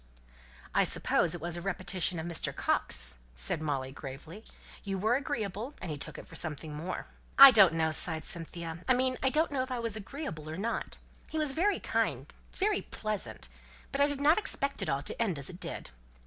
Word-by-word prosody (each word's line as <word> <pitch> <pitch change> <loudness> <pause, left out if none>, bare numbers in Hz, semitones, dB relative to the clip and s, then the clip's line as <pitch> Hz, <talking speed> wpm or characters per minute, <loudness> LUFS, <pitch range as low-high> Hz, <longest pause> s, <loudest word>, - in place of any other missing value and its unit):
"I - - +4
suppose 170 0 +2
it 170 - -8
was 170 0 -2
a - - -5
repetition 185 -1 -1
of 160 - -4
Mr. 170 -2 -3
Coxe," 65 0 +1 0.2
said 60 - +4
Molly, 135 -4 -2
gravely. 150 +9 -9 0.4
"You 195 -2 -3
were 220 +5 +2
agreeable, 235 -1 -3
and 160 - -5
he 150 - -4
took - - -5
it - - -9
for - - -15
something 155 -1 -4
more." 165 +5 -5 0.3
"I 275 0 +12
don't 195 -8 +6
know," 160 -1 +1
sighed 160 0 +3
Cynthia. 170 -3 -5
"I 255 - +6
mean 255 0 0
I 265 - +3
don't 310 +4 +1
know 275 -2 0
if 260 - -4
I 255 - -2
was 230 -2 -2
agreeable 205 - -6
or 160 - -5
not. 225 +4 -3 0.3
He 315 - -4
was 305 -3 +3
very 370 +9 +1
kind - - -1 0.3
very 405 0 +1
pleasant 215 - -5 0.4
but 275 - -1
I 285 - +6
did 285 -1 -1
not 305 +7 +5
expect 280 -9 -1
it - - -2
all 140 +1 -1
to - - -4
end 195 -9 0
as 140 +3 -5
it 180 - -12
did. - - -6
190 Hz, 205 wpm, -30 LUFS, 160-260 Hz, 0.4 s, I